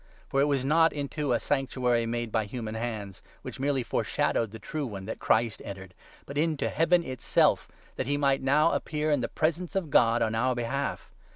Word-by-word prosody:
For 135 - +2
it - - +5
was 140 -3 0
not 160 +3 +4
into 145 +1 -3
a 120 - +4
24 - - -7
Sanctuary 125 -4 0
made 120 -1 -3
by 110 -1 +1
human 110 0 -5
hands, 110 -4 -5 0.2
which - - -7
merely 135 -1 +1
foreshadowed 115 -1 0
the 110 - -9
true 145 +6 -4
one, 100 -4 -7
that 110 - -5
Christ 115 -1 +1
entered, 95 -2 -8 0.3
but 140 +1 -4
into 155 -2 0
Heaven 170 +2 +3
itself, 130 -5 +1 0.3
that 130 - -2
he 145 0 +1
might 140 -1 +2
now 150 +5 +3
appear 155 0 -1
in 145 -3 +2
the 115 - -1
presence 165 +3 -1
of 175 -6 -1
God 115 -2 +4
on 110 - 0
our 125 +3 +1
behalf. 130 +4 -3
130 Hz, 200 wpm, -28 LUFS, 115-145 Hz, 0.3 s, it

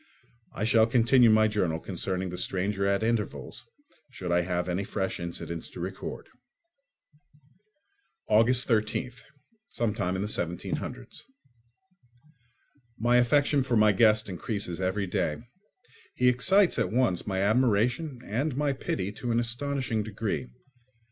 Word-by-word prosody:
I 100 - -3
shall 110 0 +4
continue 120 +1 +5
my 110 0 +5
journal 90 -7 -1
concerning 95 +1 -3
the 90 - -6
stranger 100 +1 -1
at 100 +2 +1
intervals, 115 -1 -3 0.4
should 95 -8 -6
I 85 0 +3
have 90 0 -2
any 90 +2 -1
fresh 95 -1 -3
incidents 85 -1 -6
to - - -11
record. - - -6 2.0
August 115 +4 +4
13th, 120 +2 -1 0.6
17—. 95 - -2 1.9
My 120 +2 +3
affection 140 +3 +3
for 125 -3 0
my 105 0 +5
guest 110 +1 +4
increases 95 -1 -4
every 95 +2 -1
day. 80 -4 -1 0.8
He 125 0 +4
excites 180 +8 +3
at 115 - 0
once 115 -7 +1
my 95 -2 -2
admiration 125 +5 +1
and 130 +6 -2
my 145 -1 +1
pity 100 -7 -3
to 120 +3 -4
an 115 - +2
astonishing 120 -1 -1
degree. 105 - -3
110 Hz, 120 wpm, -28 LUFS, 95-125 Hz, 2.0 s, continue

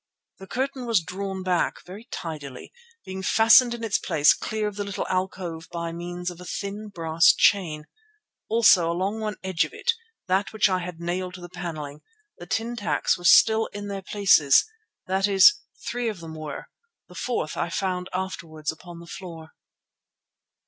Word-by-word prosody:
The 190 - -11
curtain 260 +1 -3
was 230 -4 +3
drawn 190 +3 -5
back, 180 -2 -1
very 200 +6 -10
tidily, 150 - -7 0.3
being 190 0 -6
fastened 230 +4 +5
in 230 - -8
its 220 -3 +1
place 150 -1 +4
clear 215 -1 -3
of 210 - -5
the 205 - -3
little 200 -1 -4
alcove 185 -3 -3
by 170 -1 -4
means 175 +1 -5
of 175 0 -12
a - - -9
thin 200 +3 -5
brass 165 -3 +4
chain. 160 -7 +2 0.6
Also 210 -7 +5
along 190 +5 -2
one 215 -1 -3
edge 185 -3 +1
of - - -7
it, 475 - +1 0.3
that 190 +3 0
which 220 - +3
I 185 -2 0
had 175 -2 -7
nailed 180 +1 -3
to 180 - -11
the 175 - -9
panelling, 155 -5 -6 0.4
the 175 - -10
tin 225 +5 -2
tacks 210 - 0
were 175 - -10
still 220 +5 +6
in 205 0 -6
their 195 -1 -4
places; 190 -8 +4 0.4
that 190 +2 +1
is, 200 - +6 0.3
three 240 -1 -1
of 210 -5 -6
them 165 -1 -9
were, 155 -2 -7 0.4
the 180 - -15
fourth 175 -3 -3
I 170 - -2
found 180 0 -2
afterwards 165 -5 -4
upon 170 +1 -12
the - - -11
floor. 165 -3 -9
185 Hz, 175 wpm, -25 LUFS, 170-205 Hz, 0.6 s, still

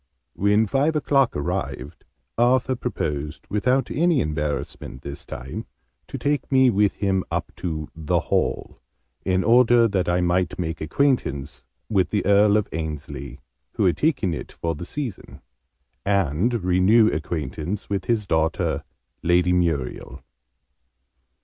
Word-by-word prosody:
When 105 +3 +3
five 140 +8 +1
o'clock 140 -4 +2
arrived, 70 0 -4 0.3
Arthur 130 +2 +3
proposed 75 - -4
without 125 +6 +1
any 165 0 +2
embarrassment 75 - -3
this 70 0 -8
time 65 +2 -6 0.4
to - - -6
take 145 0 -1
me 130 -2 +5
with 105 -1 +2
him 95 -2 0
up - - -3
to 80 -4 -4
'the 80 -2 0
Hall,' - - -1 0.5
in 95 0 +1
order 120 0 +5
that 95 -4 0
I 90 +1 +2
might 90 -1 +1
make 80 -2 -3
acquaintance 75 - -1 0.2
with 95 -4 +1
the 105 - -1
Earl 100 +1 +5
of 105 - 0
Ainslie, 75 -4 -6 0.3
who - - +1
had 90 - +2
taken 130 - +1
it - - -6
for 85 0 -3
the 80 +3 -7
season, 130 -1 -6 0.6
and 100 - +1
renew 95 +5 +4
acquaintance 80 +5 -4
with 100 -1 -2
his 115 -3 0
daughter 80 -3 0 0.4
Lady 90 +1 +3
Muriel. 80 -8 -1
95 Hz, 130 wpm, -23 LUFS, 80-115 Hz, 0.6 s, me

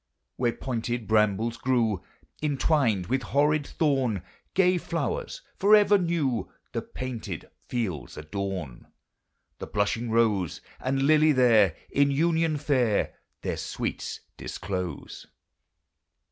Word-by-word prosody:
Where 120 -2 +1
pointed 120 -2 -3
brambles 110 +1 +2
grew, 115 -7 +1 0.4
Intwined 140 - +2
with 130 +7 0
horrid 145 +1 +2
thorn, 130 - 0 0.3
Gay 180 -1 +4
flowers, 475 - -3
forever 205 0 +6
new, 165 -9 0 0.2
The - - -2
painted 115 -9 -6 0.2
fields 110 - -3
adorn, 85 -4 -5 0.7
The - - -6
blushing 110 +3 0
rose 110 -7 +2 0.2
And 135 +1 0
lily 155 +1 +5
there, 110 - +5 0.2
In 140 0 +3
union 160 +2 +2
fair, 130 -7 +1 0.3
Their - - -2
sweets - - -4 0.2
disclose. 90 -3 -5
125 Hz, 105 wpm, -27 LUFS, 105-150 Hz, 0.7 s, forever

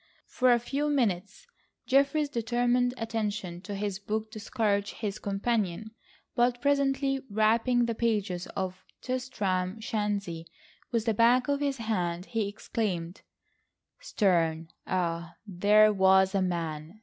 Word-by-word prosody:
For 255 -1 +2
a 240 - +6
few 280 +5 -2
minutes 215 - -1 0.4
Geoffrey's 280 +3 +3
determined 245 0 +1
attention 210 -6 -3
to 205 +1 -6
his 200 -1 -3
book 215 +2 -3
discouraged 210 -2 -1
his 210 -1 -4
companion, 205 0 -1 0.4
but 245 0 +2
presently 275 -1 +1
rapping 225 +4 +2
the 230 - -1
pages 210 -6 -1
of 185 -1 -3 0.2
Tristram 210 -7 -2
Shandy 205 -7 -3 0.4
with 230 -2 0
the 225 - +2
back 240 +4 +4
of 285 0 +1
his 280 -2 -1
hand, 180 -6 -2
he 225 -2 -1
exclaimed: 195 -4 -3 0.8
"Sterne! 165 - +1 0.2
Ah, 170 -2 -2
there 210 +2 +4
was 190 0 +4
a 195 - +2
man! 165 0 -3
215 Hz, 125 wpm, -28 LUFS, 190-240 Hz, 0.8 s, a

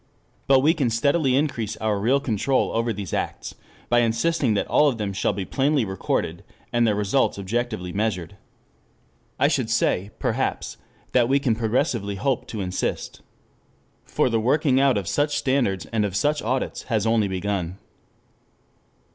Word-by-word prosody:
But 135 -1 +5
we 155 +4 +4
can 140 -8 0
steadily 140 +3 +2
increase 130 -7 -1
our 110 -2 -1
real 125 +7 +2
control 130 0 0
over 115 +1 0
these 100 -5 -6
acts - - -3 0.3
by 120 - +3
insisting 120 +2 +1
that - - 0
all 150 - +4
of 125 - -3
them 105 -3 -3
shall 95 - 0
be 100 -1 -4
plainly 140 0 +1
recorded, 95 -1 -2 0.3
and 120 -1 +3
their 105 - +2
results 105 +5 +1
objectively 105 -2 -3
measured. 100 -3 -2 1.0
I - - +4
should - - 0
say, 95 +3 +1
perhaps, - - -2 0.3
that 120 -1 +3
we 135 - +4
can 130 -5 +1
progressively 110 -2 -1
hope 125 +6 -1
to 110 - -5
insist. 90 -1 -3 0.8
For - - 0
the 115 -2 +1
working 130 +3 +2
out 135 -4 +3
of 100 -3 -3
such 145 +7 0
standards 130 -10 0
and 110 -2 +2
of 100 -2 -2
such 150 +8 +1
audits 125 +4 -2
has 110 -3 +1
only 110 -2 +2
begun. 95 -2 -3
115 Hz, 160 wpm, -24 LUFS, 100-135 Hz, 1.0 s, But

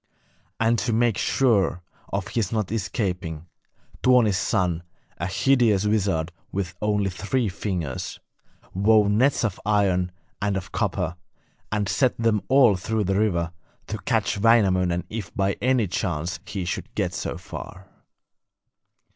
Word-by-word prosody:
And 115 0 +3
to 115 +4 -1
make 115 -1 +3
sure 100 -10 +2 0.3
of 100 +1 -2
his 110 -5 -1
not 110 -4 -1
escaping, 90 -7 -2 0.6
Tuoni's 125 -5 +4
son, 90 -2 0 0.4
a 85 - -1
hideous 110 -2 +3
wizard 95 -6 +1 0.2
with 95 -2 -3
only 105 -2 +1
three 110 +6 -1
fingers, 85 -6 -4 0.5
wove 105 +1 +4
nets 130 +7 +3
of 105 -5 -1
iron 95 -4 +2 0.3
and 100 -1 0
of 95 +1 -6
copper, 95 -4 -1 0.5
and 105 -2 0
set 130 +4 +1
them 115 -3 +2
all 130 -6 +6
through 110 +3 -1
the 100 +1 +1
river, 85 -6 +1 0.3
to - - -5
catch - - 0
Wainamoinen 95 -6 +3
if 105 -5 -5
by 100 0 +1
any 130 -3 +3
chance 85 -2 -2
he 95 -3 -4
should 85 - -4
get - - -1
so - - -3
far. 95 +1 -9
100 Hz, 135 wpm, -24 LUFS, 90-110 Hz, 0.6 s, all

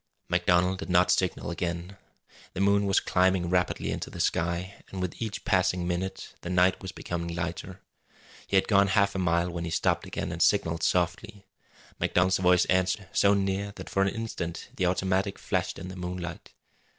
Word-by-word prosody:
MacDonald 90 +1 +2
did 95 - -6
not 90 0 +4
signal 90 -1 0
again. 85 +2 -4 0.6
The 95 - -5
moon 100 +1 +3
was 95 - +4
climbing 90 -1 +1
rapidly 90 0 0
into - - -4
the - - -9
sky, 85 +3 -1
and 95 - -6
with 90 +3 -4
each 110 -2 -4
passing 90 -2 +1
minute 95 +2 -3
the 85 - -6
night 90 +1 +3
was 95 - -6
becoming 85 -1 -4
lighter. 85 +2 -5 0.7
He - - -1
had 95 - +2
gone 100 -2 +4
half 100 0 +2
a 95 - -3
mile 85 0 +1
when 85 0 -4
he 85 - -3
stopped 80 - 0
again - - -4
and - - -4
signalled 80 0 +2
softly. 90 +3 -1 0.5
MacDonald's 90 +1 +2
voice 90 -1 +4
answered, 95 +2 0
so 100 0 +4
near 100 +1 -1
that - - -9
for 95 - +1
an 95 - +3
instant 105 -7 -5
the 90 - +1
automatic 95 +2 0
flashed - - -2
in 90 - -7
the 95 - -8
moonlight. 90 -1 -6
90 Hz, 180 wpm, -28 LUFS, 85-95 Hz, 0.7 s, not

